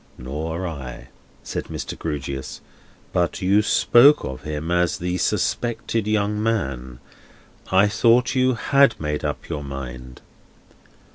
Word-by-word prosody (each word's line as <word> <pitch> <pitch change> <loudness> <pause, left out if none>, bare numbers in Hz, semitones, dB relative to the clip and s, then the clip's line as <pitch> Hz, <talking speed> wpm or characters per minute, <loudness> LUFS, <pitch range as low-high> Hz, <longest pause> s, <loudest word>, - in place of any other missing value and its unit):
"Nor 80 +7 -4
I," 65 -5 -8 0.3
said - - -4
Mr. - - -6
Grewgious. 70 -2 -5 0.5
"But 85 -1 +1
as - - -7
you 100 +3 +4
spoke 135 +6 +5
of 65 -1 -6
him 75 +2 -4
as 90 -1 +1
the 90 +1 -2
suspected 115 0 -1
young 105 0 0
man, 65 - -2 0.7
I 95 +2 +5
thought 115 +4 +3
you 130 -1 +2
had 140 +4 +3
made 75 -1 -3
up 75 -1 -4
your 75 -3 -4
mind. 65 -2 -8
85 Hz, 130 wpm, -22 LUFS, 70-110 Hz, 0.7 s, spoke